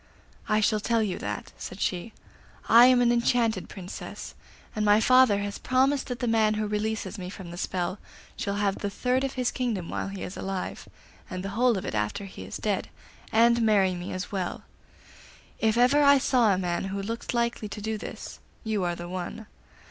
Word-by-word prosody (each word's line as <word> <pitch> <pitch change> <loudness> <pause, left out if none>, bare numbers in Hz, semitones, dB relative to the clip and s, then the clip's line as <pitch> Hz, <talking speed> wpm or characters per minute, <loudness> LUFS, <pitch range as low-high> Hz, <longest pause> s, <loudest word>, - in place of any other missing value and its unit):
'I 215 0 +3
shall 215 0 +2
tell 230 +1 +1
you 190 -4 -2
that,' - - -5
said 185 - -7
she. 185 +4 -2 0.6
'I 235 +2 +8
am 255 -1 +5
an 240 - +4
enchanted 235 -4 +1
Princess, 185 -2 -8 0.4
and 215 - 0
my 210 0 +5
father 255 -4 +5
has 205 0 -4
promised 265 +2 +2
that 245 - -4
the 245 - -2
man 220 -2 +3
who 215 0 -1
releases 215 +1 -2
me 180 -1 -5
from 185 -2 -9
the - - -7
spell 185 +1 -2 0.4
shall 200 - -2
have 205 -1 0
the 205 - -2
third 250 +6 0
of 270 - -2
his 250 -2 0
kingdom 225 -9 -2
while - - -3
he 195 -1 -6
is 180 - -6
alive, 195 -1 -5 0.4
and 185 -1 -5
the - - -3
whole 235 +2 +2
of 185 - -5
it - - -4
after 105 - -2
he 195 - -9
is - - -6
dead, - - -2 0.4
and 235 +1 +4
marry 200 -4 +3
me 175 0 -6
as 185 +1 -5
well. 185 -3 -3 1.0
If 220 0 +2
ever 255 +5 +5
I 280 0 +7
saw 245 -4 +3
a 190 - +2
man 180 0 -1
who 195 +1 -3
looked 230 +4 -4
likely 235 -2 -1
to 210 - -7
do 220 +1 -3
this, - - -8 0.2
you 215 -4 -1
are 175 -1 -1
the 175 0 -7
one. 185 +5 -5
215 Hz, 200 wpm, -27 LUFS, 190-235 Hz, 1.0 s, I